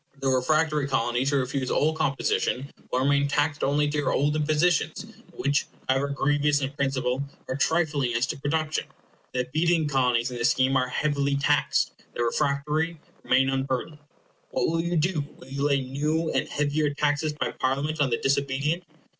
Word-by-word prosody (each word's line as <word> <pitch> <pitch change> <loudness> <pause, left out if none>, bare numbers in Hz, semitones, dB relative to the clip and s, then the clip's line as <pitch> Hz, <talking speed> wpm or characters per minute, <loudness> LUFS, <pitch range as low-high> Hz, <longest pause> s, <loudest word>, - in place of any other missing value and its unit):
The 135 0 0
refractory 150 +3 +2
Colonies 120 0 0
who 140 - +2
refuse 130 0 -1
all 155 +2 +2
composition 140 -2 -1 0.2
will 125 - +1
remain 140 +1 +3
taxed 145 +1 0
only 145 +2 +2
to 145 0 -1
your 145 - 0
old 145 +2 +1
impositions, 155 +3 +1 0.3
which, 145 -3 0 0.2
however 135 +2 +2
grievous 145 +1 +2
in 135 -1 -2
principle, 135 -2 -1 0.2
are 130 - -2
trifling 145 -5 +1
as 120 +2 +2
to 145 - -5
production. 155 +2 -1 0.5
The 125 0 0
obedient 160 +3 +1
Colonies 125 -2 +2
in 125 - -5
this 120 +3 +2
scheme 130 -3 +2
are 130 -1 +2
heavily 140 +1 0
taxed, 145 +1 +2 0.2
the 120 - 0
refractory 150 +6 0 0.2
remain 130 +1 +3
unburdened. 135 +3 -2 0.5
What - - 0
will 165 0 +1
you 170 +1 -1
do? 155 -1 +1
Will - - -14
you 140 +1 0
lay 140 -2 +2
new 150 +5 -1
and - - 0
heavier 150 0 0
taxes 150 +1 0
by 150 - -2
Parliament 145 +4 -1
on 140 - +3
the 115 - +1
disobedient? 140 +5 0
140 Hz, 170 wpm, -26 LUFS, 135-150 Hz, 0.5 s, remain